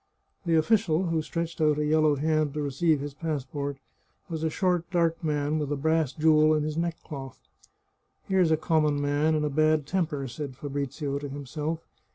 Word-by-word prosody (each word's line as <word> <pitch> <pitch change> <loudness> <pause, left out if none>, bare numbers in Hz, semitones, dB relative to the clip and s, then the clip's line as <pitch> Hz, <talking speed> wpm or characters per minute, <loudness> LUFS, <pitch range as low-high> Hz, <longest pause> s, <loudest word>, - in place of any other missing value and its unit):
The 165 - +3
official 185 0 +2
who 165 -1 +1
stretched 170 +1 -4
out 150 -1 +3
a 150 - 0
yellow 155 -1 +3
hand 155 0 0
to 150 - -1
receive 145 +2 +1
his 145 0 -5
passport 145 -2 -3 0.5
was 160 -2 -4
a 160 - +2
short, 175 0 0
dark 170 -2 +1
man, 150 0 0
with 145 -1 -3
a - - +1
brass 160 0 +1
jewel 155 0 +4
in 150 - 0
his 155 0 -3
neckcloth. 155 -5 -4 0.5
" - - -47
Here's 185 -3 +3
a 160 - +3
common 155 -2 +1
man, 145 +2 +1
in 150 - 0
a 150 - +1
bad 155 0 +2
temper," 150 -5 -1
said 130 +2 -6
Fabrizio 140 +1 -3
to 145 0 -6
himself. 150 +4 -4
155 Hz, 185 wpm, -27 LUFS, 145-160 Hz, 0.5 s, jewel